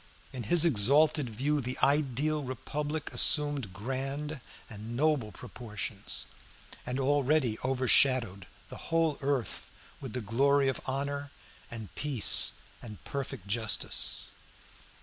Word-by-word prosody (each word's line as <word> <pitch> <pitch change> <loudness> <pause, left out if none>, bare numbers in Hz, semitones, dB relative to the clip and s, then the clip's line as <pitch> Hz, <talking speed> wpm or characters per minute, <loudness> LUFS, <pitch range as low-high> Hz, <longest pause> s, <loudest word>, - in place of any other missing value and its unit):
In 130 - -5
his 175 -1 +5
exalted 145 +2 +3
view 140 +7 0
the 125 0 -4
ideal 145 +1 +2
republic 145 +3 -4
assumed 145 - +4
grand 135 +8 -4 0.3
and 110 +1 -8
noble 140 -5 +1
proportions, 105 -1 -6 0.6
and 125 +2 -2
already 140 -3 +2
overshadowed 130 -6 +2 0.2
the - - -7
whole 165 -3 +1
earth 135 -6 -2 0.3
with 130 -5 -7
the 125 - -3
glory 135 +6 +2
of 135 - -3
honor 140 +1 -3 0.4
and 110 -5 -8
peace 140 -7 +4 0.3
and 105 -6 -10
perfect 135 -7 -5
justice. 110 +1 -1
135 Hz, 110 wpm, -30 LUFS, 115-145 Hz, 0.6 s, his